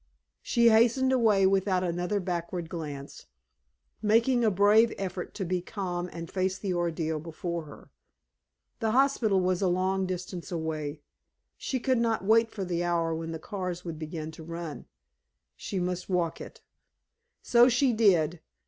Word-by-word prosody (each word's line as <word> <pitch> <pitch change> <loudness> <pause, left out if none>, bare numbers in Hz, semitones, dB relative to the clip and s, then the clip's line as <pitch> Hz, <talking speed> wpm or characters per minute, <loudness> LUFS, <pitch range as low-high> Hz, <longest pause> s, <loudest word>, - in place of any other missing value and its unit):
She 235 -1 +4
hastened 235 +4 +4
away 220 -6 +4
without 190 -1 +2
another 180 +3 -1
backward 175 -2 -4
glance, 145 -5 -7 0.7
making 230 +3 +3
a 220 - +4
brave 210 +4 +5
effort 185 -2 -5
to 195 - -3
be 180 +1 -1
calm 180 -2 -4
and 170 0 -7
face 190 +1 -1
the 190 -1 -2
ordeal 165 -2 -1
before 170 +1 -5
her. 145 - -14 0.9
The 220 -2 0
hospital 250 -7 +3
was 185 0 0
a 190 - +2
long 185 +1 0
distance 180 -1 -5
away. 155 -3 -3 0.5
She 260 - -3
could 255 0 +1
not 225 -4 0
wait 225 +2 +4
for 200 -3 -5
the 175 -1 -1
hour 170 -1 0
when 165 0 -4
the 165 - -4
cars 180 +1 -5
would 165 -2 -6
begin 155 0 -5
to 160 - -11
run. 165 -1 -7 0.7
She 195 - -5
must 180 +1 -3
walk 175 -3 -1
it. - - -10 0.8
So 240 +1 +6
she 250 +1 +2
did. 175 -7 +3
185 Hz, 155 wpm, -28 LUFS, 170-215 Hz, 0.9 s, So